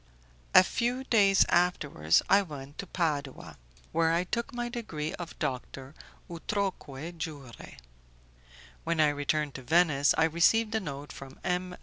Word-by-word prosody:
A - - +10
few 245 +6 -1
days 200 -6 +4
afterwards 150 - +2
I 200 +1 +5
went 145 -5 -9
to 195 - -5
Padua, 150 - -3 0.3
where 165 0 +2
I 170 +2 +1
took 235 +6 -3
my 240 0 -3
degree 210 -11 -5
of 175 -2 -8
doctor 130 +1 -5 0.3
'utroque 170 -4 -4
jure'. 145 - -8 1.1
When 170 -1 -1
I 155 -1 +5
returned 145 0 -1
to 130 - -8
Venice, 150 0 +3
I - - +4
received 190 +8 +3
a 220 - +1
note 145 -6 -7
from 135 -1 -11
M. 180 0 -2
165 Hz, 140 wpm, -29 LUFS, 145-195 Hz, 1.1 s, A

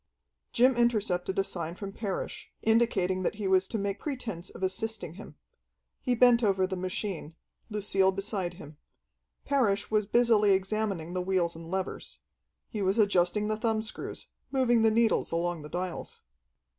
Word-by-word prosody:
Jim 255 +2 +4
intercepted 210 -6 +1
a 195 - +3
sign 170 -4 -4
from 195 +1 -6
Parrish, 200 -2 -4
indicating 210 -5 +2
that 185 - -1
he 205 -2 -3
was 190 0 +3
to 225 - -3
make 200 0 -2
pretense 225 - -5
of - - -9
assisting 205 -2 -1
him. 180 -5 -11 0.7
He 250 - +1
bent 245 0 +6
over 195 -3 +3
the 190 0 -3
machine, 185 -3 -4 0.3
Lucille 195 -2 +2
beside 195 -2 -3
him. 150 -4 -12 0.7
Parrish 220 -9 +1
was 215 -2 +2
busily 220 -3 +4
examining 190 -3 -1
the 185 - -1
wheels 180 -2 0
and 165 0 -9
levers. 190 +1 -4 0.5
He 215 - -4
was 195 +2 +1
adjusting 205 0 +3
the 215 0 -1
thumbscrews, 220 -1 -3 0.3
moving 245 -4 +3
the 225 - +5
needles 225 +1 +2
along 170 0 -1
the 150 - -9
dials. 180 +1 -5
195 Hz, 155 wpm, -29 LUFS, 185-220 Hz, 0.7 s, bent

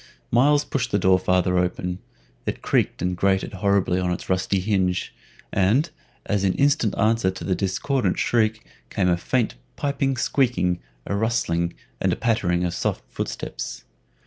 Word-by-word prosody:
Myles 145 +5 +4
pushed 125 -3 -1
the 100 - +3
door 95 -1 +4
farther 90 0 +2
open; 90 0 -2 0.5
it - - -3
creaked - - +1
and 90 0 0
grated 95 +4 +1
horribly 95 -2 +1
on 90 -1 0
its 90 - -3
rusty 95 +1 +1
hinge, 95 -2 0 0.4
and, 115 - +2 0.3
as 100 -2 0
in 95 -2 +3
instant 140 -6 +2
answer 110 -2 +3
to 95 0 -6
the 95 - 0
discordant 100 +4 0
shriek, 110 -2 +1 0.2
came 95 - 0
a 90 - +4
faint 115 +6 0 0.2
piping 140 -2 0
squeaking, 120 -10 +1 0.3
a 100 - -2
rustling 100 -6 0 0.3
and - - +2
a - - +1
pattering 90 -7 +1
of 90 -1 -1
soft - - -2
footsteps. - - -5
100 Hz, 155 wpm, -24 LUFS, 90-115 Hz, 0.5 s, Myles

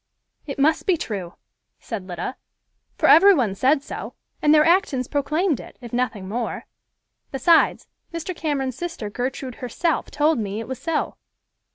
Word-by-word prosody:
"It 275 - -5
must 305 +3 +2
be 370 -3 +4
true," 190 - -5 0.4
said 200 -5 -6
Lida, 180 +8 -4 0.6
"for - - +2
every 395 +3 +8
one 235 - +1
said 275 +8 +2
so, - - -7 0.3
and 300 - +4
their 305 0 +6
actions 330 - +2
proclaimed 300 - 0
it, - - -12
if 240 -2 -10
nothing 240 -6 -1
more; 230 +4 -3 0.7
besides, 305 +5 +3 0.3
Mr. 335 +2 -4
Cameron's 275 -6 -2
sister, 330 -10 -5
Gertrude 255 +2 -3
herself, 285 +7 -1
told 300 -2 +2
me 205 0 -3
it 225 - -6
was 260 0 -5
so." 330 -2 -2
270 Hz, 155 wpm, -23 LUFS, 235-320 Hz, 0.7 s, every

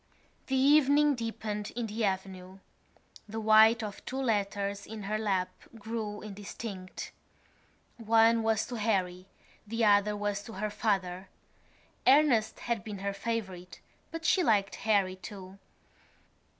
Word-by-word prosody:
The 265 - 0
evening 290 +1 +5
deepened 220 -3 -4
in 240 -1 -2
the 220 +1 -2
avenue. 190 -1 -4 0.7
The 220 +2 -4
white 220 +1 +6
of 205 -2 -7
two 260 - -5
letters 200 -4 -1
in 215 -1 -7
her 215 +2 -2
lap 195 -4 0 0.2
grew 220 -1 -5
indistinct. 200 -2 -7 0.9
One 225 0 +4
was 220 -1 +1
to 240 -2 -4
Harry; 185 -4 -1 0.4
the 230 +1 0
other 205 0 +4
was 205 -1 -2
to 225 - -9
her 210 +1 -3
father. 190 -3 -1 0.8
Ernest 260 -5 +4
had 235 -5 -2
been 210 -2 -6
her 200 - -1
favourite 195 -4 -5 0.3
but 330 0 -7
she 370 - +4
liked 205 - +2
Harry 200 -3 +1
too. 190 +1 -10
210 Hz, 130 wpm, -30 LUFS, 195-230 Hz, 0.9 s, white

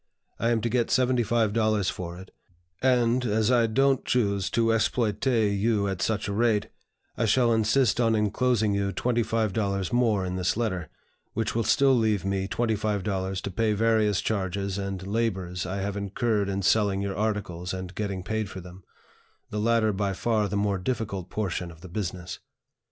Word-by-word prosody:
I 115 - +1
am 115 -2 +1
to 120 - 0
get 120 0 +1
$75 115 -5 +2
for 85 -1 -6
it, 95 +1 -12 0.5
and, 125 -1 +3
as 110 0 +1
I 120 -2 +4
don't 135 +3 +2
choose 100 -5 0
to 115 -1 +2
exploiter 115 +1 +1
you 100 0 +1
at 95 -3 -3
such 105 +2 0
a 100 - -2
rate, 110 -1 +1 0.5
I 115 - 0
shall 115 +2 +3
insist 110 +2 +2
on 115 -1 +3
inclosing 110 0 +1
you 100 0 0
$25 110 -4 -1
more 110 -6 +2
in 90 0 -3
this 90 +3 0
letter, 95 -8 -2 0.4
which 115 0 -1
will 115 - 0
still 135 +5 +4
leave 110 -5 +1
me 95 0 -1
$25 100 -4 -1
to 100 - -4
pay 110 +3 +1
various 110 -2 +2
charges 100 -1 -2
and 95 -1 -4
labors 95 -5 -2
I 95 +1 -3
have 100 0 -3
incurred 105 0 -1
in 100 0 -2
selling 100 -1 +2
your 100 -1 -3
articles 100 -5 -2
and 95 -1 -5
getting 100 -3 -3
paid 110 0 -2
for 95 - -7
them, 90 +1 -12 0.7
the 105 - -2
latter 110 -1 +2
by 100 0 -1
far 110 +1 0
the 100 - -1
more 100 -1 0
difficult 100 -4 -3
portion 95 -4 -3
of 80 -1 -14
the 95 - -9
business." 90 -2 -5
105 Hz, 170 wpm, -26 LUFS, 95-115 Hz, 0.7 s, I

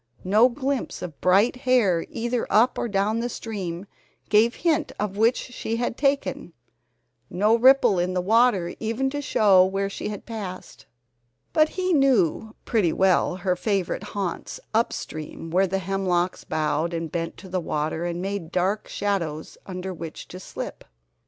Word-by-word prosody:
No 215 +7 +5
glimpse 265 0 -3
of 165 -5 -8
bright 200 +7 +4
hair 240 -10 +2
either 240 +1 -2
up 235 +4 +3
or - - -1
down 210 +2 0
stream 195 -6 -5 0.4
gave 220 +3 +4
hint 320 -3 +2
of 205 -2 -2
which 225 +4 +3
she 230 -2 -4
had 235 0 -2
taken, 275 - -1 0.8
no 210 +5 +3
ripple 250 -5 +5
in 180 +1 -1
the - - +2
water 205 -3 +3
even 230 +4 -1
to 290 +1 -3
show 200 -8 +5
where 195 +1 -1
she - - -4
had 205 -2 -7
passed. 205 -5 -8 0.7
But 310 0 +4
he 370 -1 +1
knew 225 - +2
pretty 205 -8 +2
well 185 -1 +2
her 180 0 0
favorite 195 -2 -1 0.2
haunts 190 -4 -3
up 230 +2 +2
stream 155 +1 -7
where 190 +3 +3
the 195 +2 -1
hemlocks 185 -1 -1
bowed 155 +2 -1
and 165 -2 -4
bent 165 -1 -3
to 190 - -11
the 185 0 -2
water, 155 +1 -2
and 175 +1 -3
made 195 -4 -4
dark 190 +4 0
shadows 170 -7 -3
under 185 0 -5
which 165 -2 -8
to 185 - -8
slip. - - -7
195 Hz, 160 wpm, -24 LUFS, 180-230 Hz, 0.8 s, No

